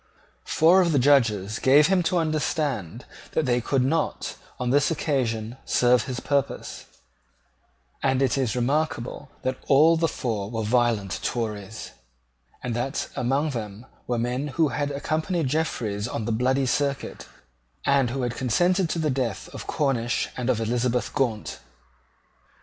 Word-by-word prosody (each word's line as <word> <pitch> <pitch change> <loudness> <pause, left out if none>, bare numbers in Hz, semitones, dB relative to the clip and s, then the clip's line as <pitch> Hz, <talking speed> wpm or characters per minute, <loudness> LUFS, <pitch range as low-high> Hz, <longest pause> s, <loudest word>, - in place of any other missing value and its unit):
Four 175 +4 +5
of 170 -3 +2
the - - +3
Judges 115 -7 +3
gave 140 +3 +6
him 185 +2 +3
to 180 - +1
understand 150 - -1 0.3
that 160 - +1
they 125 -1 +2
could 130 +2 +1
not, 160 +5 -1 0.2
on 125 -1 -1
this 145 +2 +3
occasion, 125 -8 -1
serve 125 0 +3
his 125 -2 -4
purpose; 140 -1 -2 1.1
and 130 -1 +2
it 135 -2 +2
is 130 -5 0
remarkable 135 +1 -1
that 130 0 -2
all 155 +4 +6
the 165 0 +2
four 110 -9 -3
were 115 -1 -3
violent 115 -3 +1
Tories, 110 -3 -4 0.7
and 120 -2 -2
that 120 +3 -2
among 140 +5 0
them 110 -2 -6 0.2
were 120 - 0
men 125 +4 -1
who 155 +2 +1
had 145 0 -2
accompanied 155 +4 -1
Jeffreys 115 -9 -1
on 115 -3 -4
the 115 - -1
Bloody 130 +4 +1
Circuit, 140 +2 -2 0.6
and 140 -3 +3
who 130 +1 -2
had 120 -1 -2
consented 175 - +2
to - - -2
the 155 -3 +1
death 125 -6 -2
of - - -8
Cornish 125 -5 0
and 125 0 -2
of 115 - +2
Elizabeth 120 +1 0
Gaunt. 120 -7 -1
130 Hz, 150 wpm, -25 LUFS, 115-145 Hz, 1.1 s, gave